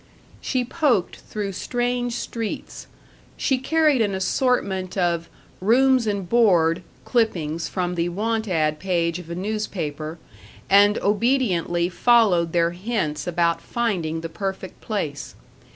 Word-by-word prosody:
She 255 -2 -1
poked 250 - +1
through 205 -2 -5
strange 245 +4 -2
streets. 230 -2 -5 0.5
She 265 -2 +1
carried 305 -1 +3
an 205 -3 +1
assortment 190 -3 0
of 170 -2 0 0.3
"Rooms 250 +4 +3
and 200 -3 -2
Board" 175 -7 +3 0.2
clippings 170 - 0
from 180 -2 -2
the 170 0 -1
"want 220 +4 -1
ad" 155 -4 0
page 170 -2 0
of 175 -2 -11
a 170 - -4
newspaper, 175 -6 -4 0.5
and 205 +1 +6
obediently 200 -6 +1
followed 185 -4 +3
their 170 0 +2
hints 175 -6 -3
about 170 -1 +1
finding 175 -9 -2
the 165 - -4
perfect 190 +1 -5
place. 155 -10 -4
190 Hz, 120 wpm, -23 LUFS, 170-230 Hz, 0.5 s, and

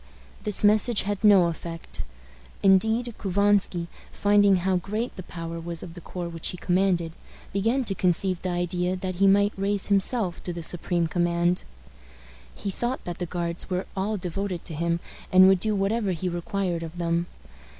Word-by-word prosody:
This 210 -1 +4
message 215 +2 +4
had 205 +1 -3
no 200 -4 +7
effect. 165 0 -5 0.6
Indeed, 220 +5 +3
Couvansky, 200 -2 +2 0.3
finding 205 -1 +4
how 185 +1 +1
great 215 +7 -3
the 185 - -6
power 165 -1 -6
was 170 0 -5
of 170 - -9
the 175 - -10
corps 175 +1 -5
which 165 -1 -5
he 180 - -2
commanded, 175 -2 +1 0.4
began 225 +7 +1
to 210 - -2
conceive 185 0 0
the 185 - -2
idea 175 +1 -1
that 185 -1 -4
he 195 +1 +4
might 200 +1 +4
raise 200 +1 -1
himself 200 -1 +1
to 180 - -4
the 170 -1 -6
supreme 175 0 -1
command. 175 +1 +1 0.9
He 200 - -4
thought 240 +6 -3
that 175 -1 -5
the 175 - -3
Guards 170 0 -4
were 185 0 -1
all 205 +3 -1
devoted 180 0 -4
to - - -6
him, 170 +2 0 0.3
and 185 0 +8
would 190 -1 +5
do 215 +2 0
whatever 200 0 0
he 180 +2 -3
required 175 0 -2
of 165 +1 -7
them. 170 0 0
185 Hz, 170 wpm, -26 LUFS, 175-200 Hz, 0.9 s, and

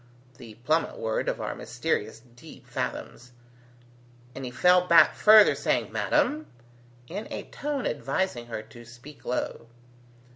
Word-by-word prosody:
the 115 -3 -12
plummet 160 +2 0
word 110 -1 -2
of - - -3
our - - -3
mysterious 110 +2 -3
deep 120 - -14
fathoms; 125 +1 -6 1.0
and 135 - -8
he 125 - -4
fell 180 +7 +3
back 170 - +6
further 215 -1 +7
saying, - - -1
"Madam?" 305 +1 0 0.6
in 200 - -6
a - - -5
tone 285 -2 -4
advising 135 -2 -2
her 115 -2 -6
to 115 +2 -14
speak 120 +5 -14
low. 125 -1 -3
135 Hz, 135 wpm, -26 LUFS, 120-180 Hz, 1.0 s, further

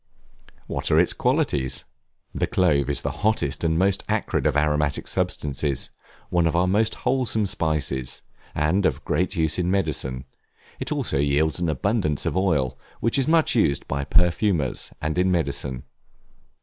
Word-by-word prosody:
What - - -3
are - - +4
its - - +3
qualities? 65 -3 0 0.5
The - - -1
Clove 75 -7 +2
is 70 - 0
the - - -1
hottest, 105 -11 +1
and 80 -1 +2
most 95 +2 +1
acrid - - 0
of - - +1
aromatic 75 -2 0
substances; 70 -1 -1 0.4
one 85 -2 +3
of 80 - -1
our 90 +1 +3
most 105 +4 +1
wholesome 125 -4 +1
spices, 75 -8 -1 0.3
and 85 +6 +2
of - - -3
great 90 +5 0
use 80 0 +1
in 90 0 0
medicine; 70 -9 -1 0.5
it - - -4
also 70 - -1
yields 75 +4 +1
an 85 -2 0
abundance 80 - 0
of - - -1
oil, 80 -9 +1 0.2
which 115 +4 +1
is 135 - +1
much 160 0 +4
used 90 - +1
by 70 0 -2
perfumers, 85 - +1
and 80 +3 -1
in 90 +1 +3
medicine. 70 -6 -2
80 Hz, 155 wpm, -24 LUFS, 70-95 Hz, 0.5 s, are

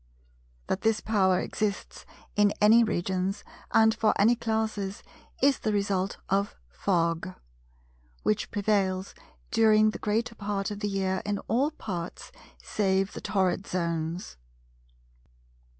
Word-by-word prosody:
That 190 - -2
this 225 -1 +2
power 190 -4 +2
exists 210 -2 -3 0.3
in 205 0 +4
any 220 +3 +6
regions 190 -1 -1 0.3
and 220 0 +5
for 220 -1 +1
any 225 +4 +5
classes 220 -4 -2 0.4
is 275 -1 +4
the 215 - -1
result 200 -2 0
of 200 +2 0 0.2
Fog; 170 - 0 0.9
which 210 -1 0
prevails 195 -2 0 0.4
during 215 -1 +5
the - - -7
greater 220 +2 -1
part 205 -2 -3
of 205 - -5
the 205 0 -1
year 190 -1 -1
in 205 0 -1
all 255 +7 +2
parts 180 - -6 0.3
save 195 -1 0
the - - -7
torrid 190 -1 0
zones. 170 - -3
200 Hz, 120 wpm, -28 LUFS, 190-215 Hz, 0.9 s, any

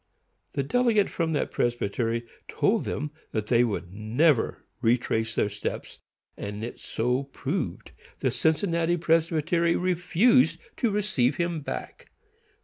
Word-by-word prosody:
The 140 - 0
delegate 225 - +2
from 165 -2 -1
that 150 - -1
presbytery 115 0 -1 0.2
told - - +1
them 150 +1 -3 0.2
that 110 -2 -1
they 120 +2 +4
would 100 -6 -3
never 115 +7 +1 0.2
retrace 115 -1 +1
their - - +2
steps, - - -5 0.4
and 105 +3 -5
so 125 +3 -1
it 140 0 -9
proved. 140 - -3 0.3
The - - +1
Cincinnati 165 +1 +1
Presbytery 165 0 +2
refused 185 +7 +3 0.2
to 240 - +2
receive 200 - +1
him 170 -1 -1
back. 145 - -7
150 Hz, 125 wpm, -27 LUFS, 115-170 Hz, 0.4 s, they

